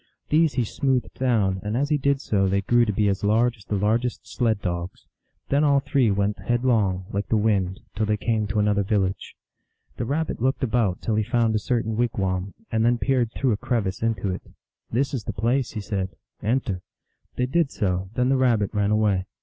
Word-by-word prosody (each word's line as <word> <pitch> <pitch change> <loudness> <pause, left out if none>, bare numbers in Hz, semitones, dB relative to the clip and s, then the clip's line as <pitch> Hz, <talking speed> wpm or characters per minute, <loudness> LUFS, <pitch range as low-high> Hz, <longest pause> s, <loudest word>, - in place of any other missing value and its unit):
These 160 0 +3
he 125 - +1
smoothed 130 +3 -1
down, 105 -7 +1
and 105 +3 -2
as 140 +2 0
he 150 - +2
did 140 0 +1
so 95 -2 +1
they 100 +1 +1
grew 120 +3 +4
to 105 - 0
be 105 +1 +1
as 100 0 0
large 115 +4 +2
as 105 - -17
the 105 - -2
largest 115 +5 0
sled 110 -4 0
dogs. 85 -2 -4 0.4
Then 140 +2 +3
all 140 -2 +4
three 135 -3 +2
went 100 +1 0
headlong, 115 -7 +1
like 100 +1 -2
the 110 - +2
wind, 100 -4 +1
till 110 +1 0
they 105 0 +1
came 110 0 0
to 100 +1 -3
an 105 0 +3
other 100 -1 +2
village. 95 -2 -1 0.6
The - - -2
Rabbit 150 +1 -2
looked 130 +2 0
about 110 -6 0
till 110 - 0
he 110 0 +2
found 115 0 +1
a 110 - +2
certain 110 -1 -1
wigwam, 95 -5 -1 0.2
and 110 0 +1
then 120 +1 +3
peered 125 -3 +1
through 130 -3 +1
a 105 - +1
crevice 105 -5 -2
into 110 -4 0
it. - - -5 0.3
" - - -45
This 135 +5 0
is 125 -5 -3
the - - -3
place," 120 +4 0
he 110 - -4
said. 100 -3 -2 0.2
" - - -44
Enter." 105 -8 -1 0.6
They 125 - +2
did 150 +3 +1
so; 95 -3 -1
then 125 0 +2
the 135 - +3
Rabbit 115 -6 +2
ran 105 -1 +1
away. 105 -3 +2
110 Hz, 215 wpm, -24 LUFS, 100-125 Hz, 0.6 s, grew